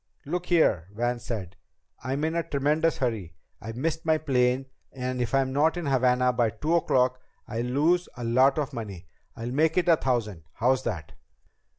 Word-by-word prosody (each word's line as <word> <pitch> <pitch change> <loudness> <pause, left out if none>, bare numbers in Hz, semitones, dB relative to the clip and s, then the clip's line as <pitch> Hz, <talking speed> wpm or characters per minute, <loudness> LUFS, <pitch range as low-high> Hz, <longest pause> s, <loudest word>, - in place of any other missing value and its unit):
"Look 175 +4 -3
here," 110 - +3
Van 120 +2 -1
said. 100 -6 -6 0.5
"I'm 135 +4 -2
in 160 +1 0
a 170 - +1
tremendous 150 +2 +1
hurry. 110 -10 -2 0.3
I 115 +2 -6
missed 160 +6 -2
my 160 -1 +3
plane, 130 -3 +1 0.3
and 125 -1 -3
if 120 +1 -1
I'm 135 -1 +1
not 155 +5 +2
in 175 - -3
Havana 125 -2 +3
by 120 -2 +2
two 155 +9 -2
o'clock 130 -6 +2 0.3
I'll 115 - -3
lose 155 +8 +1
a 120 - -5
lot 130 +5 +4
of 150 -2 -2
money. 100 -7 -6 0.3
I'll 120 +1 -5
make 155 +5 +2
it 180 - +2
a 165 -2 +6
thousand. 105 - -2
How's 130 +3 +1
that?" 85 -10 -4
130 Hz, 180 wpm, -27 LUFS, 120-155 Hz, 0.5 s, a